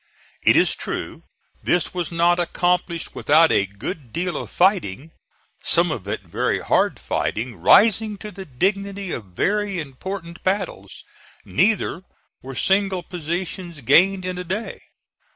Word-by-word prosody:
It - - +5
is - - +4
true - - -5 0.4
this 175 -2 +1
was 175 -2 -3
not 170 +1 +3
accomplished 175 0 0
without 160 +2 +4
a 100 - +3
good 115 - -7
deal 175 +4 -2
of - - -5
fighting 165 - +1 0.5
some 170 0 +2
of 100 -10 -5
it 105 0 -3
very 90 -4 -1
hard - - +1
fighting, 115 +2 -2
rising 210 - +4
to 210 +1 -8
the 190 0 -9
dignity 195 +6 -1
of 115 - -4
very 205 -2 0
important 170 +4 -7
battles 185 - -3 0.4
neither 185 - +1 0.4
were 135 0 -8
single 195 +2 +1
positions 175 0 -5
gained 180 +9 +4
in 180 -1 -3
a - - -3
day. 190 +6 -4
175 Hz, 135 wpm, -22 LUFS, 145-195 Hz, 0.5 s, It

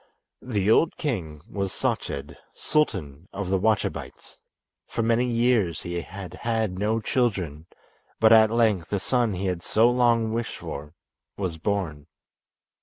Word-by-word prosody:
The 105 -4 0
old 160 +8 +3
king 80 - -3
was 100 -2 -3
Sached, 70 - -2 0.2
Sultan 90 - -1
of 100 -2 -4
the 95 - +2
Wachabites. 110 +2 -1 0.5
For 115 - -2
many 115 +2 +2
years 115 -8 +1
he 85 0 -3
had 95 0 -9
had 110 -2 -1
no 110 +2 +1
children, 95 - -1 0.5
but 110 0 +6
at 110 -1 +7
length 110 -7 +2
the 100 - 0
son 120 +1 +1
he 95 +2 -3
had 90 -2 -1
so 115 +6 +3
long 120 -2 +2
wished 115 0 -3
for 75 +3 -7 0.4
was 90 -5 -3
born. 80 -7 -2
100 Hz, 140 wpm, -25 LUFS, 90-115 Hz, 0.5 s, at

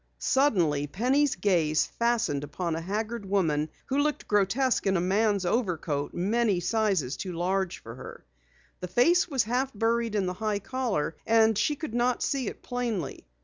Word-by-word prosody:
Suddenly 175 - +2
Penny's 260 - +1
gaze 170 -5 +2
fastened 230 -12 0
upon 160 +3 -3
a 165 - -3
haggard 215 +5 -3
woman 160 -6 0 0.2
who 270 +2 -1
looked 300 0 -1
grotesque 210 +5 +1
in 190 -1 +3
a - - +1
man's 200 +2 +1
overcoat 170 - -1
many 205 +1 +1
sizes 190 - 0
too 185 -2 -5
large 185 +2 -1
for 115 - -10
her. 125 - -11 0.5
The 180 - -5
face 330 - +3
was 270 -5 +2
half 250 +4 -1
buried 230 +1 0
in 200 -2 +1
the 180 - -2
high 215 +1 -1
collar, 220 - -2
and 225 0 +4
she 295 +8 +1
could 300 -4 -6
not 245 +1 +1
see 270 -3 -1
it - - -7
plainly. 230 - -3
205 Hz, 165 wpm, -27 LUFS, 175-240 Hz, 0.5 s, and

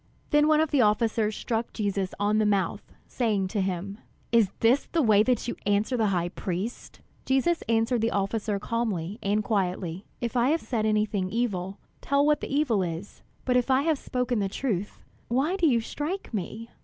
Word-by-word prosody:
Then 295 0 +5
one 310 0 +4
of 315 -1 +1
the 285 - +4
officers 215 0 +2
struck 230 0 -3
Jesus 200 -3 -2
on 210 +1 +2
the 215 - +2
mouth, 200 -2 -1
saying 210 -6 0
to 205 0 -1
him: 190 +2 -3 0.3
"Is 230 -4 +4
this 240 +5 +3
the 335 - +1
way 215 -3 +5
that 245 +1 +1
you - - -2
answer 205 +5 +1
the 225 -3 +2
high 175 -3 0
priest?" 190 +5 -5 0.2
Jesus 270 +6 +1
answered 230 +1 +2
the 225 - +2
officer 205 +1 -1
calmly 210 -3 -2
and 205 +2 +1
quietly: 185 -3 -2
"If 240 0 -3
I 245 +2 +3
have 325 +2 +2
said 220 -4 -1
anything 210 -3 0
evil, 200 -4 -2 0.2
tell 280 +1 +2
what 300 -1 +3
the - - -5
evil 275 -8 +2
is; 175 +2 -5 0.2
but 250 - +2
if 250 +1 +2
I 265 +1 +4
have 315 -3 +1
spoken 250 -2 -1
the 195 -1 0
truth, 205 -4 -3 0.2
why 275 +9 +1
do 350 -4 +3
you 240 -5 +3
strike 295 - -4
me?" 220 +3 -5
220 Hz, 190 wpm, -27 LUFS, 200-250 Hz, 0.3 s, Then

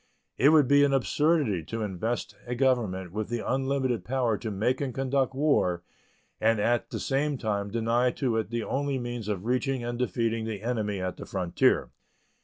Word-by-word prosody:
It 135 +6 +6
would 155 -4 +5
be 145 +1 +5
an 140 -1 +3
absurdity 135 - +2
to 115 +4 -4
invest 105 +4 -3
a 125 - -2
government 115 -9 +1
with 105 +2 -3
the 120 -1 -2
unlimited 130 -2 0
power 125 -3 0
to 110 +2 -5
make 110 +7 0
and 130 -4 -3
conduct 135 0 0
war 130 - +2 0.6
and 110 0 +3
at 120 +3 +1
the - - -4
same 140 +1 0
time 105 -3 -2
deny 115 +3 +1
to 125 -5 0
it 110 - -1
the 115 -1 -2
only 140 +2 -1
means 120 -3 -5
of 100 -2 -3
reaching 130 +1 0
and 120 0 -4
defeating 115 -2 0
the 110 -2 -5
enemy 110 -4 -1
at 90 0 -3
the - - -8
frontier. 90 -3 +1
120 Hz, 185 wpm, -28 LUFS, 110-135 Hz, 0.6 s, It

